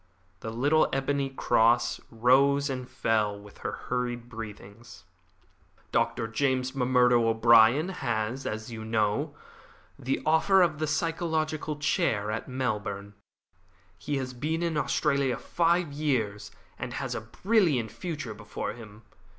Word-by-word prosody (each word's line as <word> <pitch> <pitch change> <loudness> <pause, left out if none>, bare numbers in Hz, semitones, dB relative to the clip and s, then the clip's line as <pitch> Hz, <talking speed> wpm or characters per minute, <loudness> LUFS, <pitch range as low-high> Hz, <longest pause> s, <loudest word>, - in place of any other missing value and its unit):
The 110 - -6
little 145 +8 +2
ebony 135 0 0
cross 120 -2 +2
rose 135 +4 +3
and 125 -1 -5
fell 105 -2 0
with 100 0 -15
her - - -3
hurried 120 -1 -3
breathings. 110 -1 -10 0.9
"Dr. 115 - 0
James 130 +2 0
M'Murdo 125 -2 +3
O'Brien 115 +7 +5
has, 120 - -2
as 110 +2 -5
you 110 -1 -6
know, 110 -2 0 0.6
the 130 +2 -1
offer 180 +5 +4
of 155 -3 0
the 155 - -1
physiological 155 -1 -1
chair 145 - 0
at 110 - -4
Melbourne. 105 -6 -3 0.9
He 145 - -2
has 130 -1 -4
been 155 +7 -2
in 165 -2 -1
Australia 140 -2 +1
five 170 -2 +1
years, 125 -9 -1 0.3
and - - -5
has - - -3
a - - -3
brilliant 145 - +1
future 150 -10 -5
before 105 0 -5
him. 110 -1 -13
125 Hz, 125 wpm, -28 LUFS, 110-150 Hz, 0.9 s, O'Brien